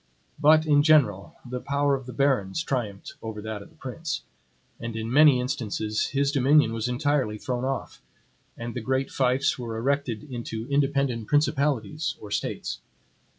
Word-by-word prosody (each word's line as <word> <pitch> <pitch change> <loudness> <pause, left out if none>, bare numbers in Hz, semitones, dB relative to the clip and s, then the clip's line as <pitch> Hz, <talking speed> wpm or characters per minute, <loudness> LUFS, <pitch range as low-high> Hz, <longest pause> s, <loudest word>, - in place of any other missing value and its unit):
But 155 +1 +5
in 145 -2 +5
general, 140 -11 +3
the 125 +1 -4
power 140 +2 +1
of 135 -2 -3
the - - -6
barons 130 -1 +1
triumphed 110 -9 -3
over 110 -1 -6
that 110 -1 -5
of - - -13
the - - -24
prince; 150 +4 -5 0.6
and 115 -1 -5
in 110 +2 -3
many 145 -3 +7
instances 110 -3 -1
his 140 0 +1
dominion 140 -3 +4
was 115 +1 -2
entirely 125 -3 0
thrown 125 +3 -3
off, 135 0 -4 0.6
and 115 0 -5
the 125 - -4
great 130 +3 -1
fiefs 130 +1 +1
were 115 -2 -4
erected 130 -2 -1
into 120 -4 -6
independent 140 -5 +1
principalities 145 -2 +1
or 105 - -10
States. - - -3
130 Hz, 155 wpm, -26 LUFS, 115-140 Hz, 0.6 s, many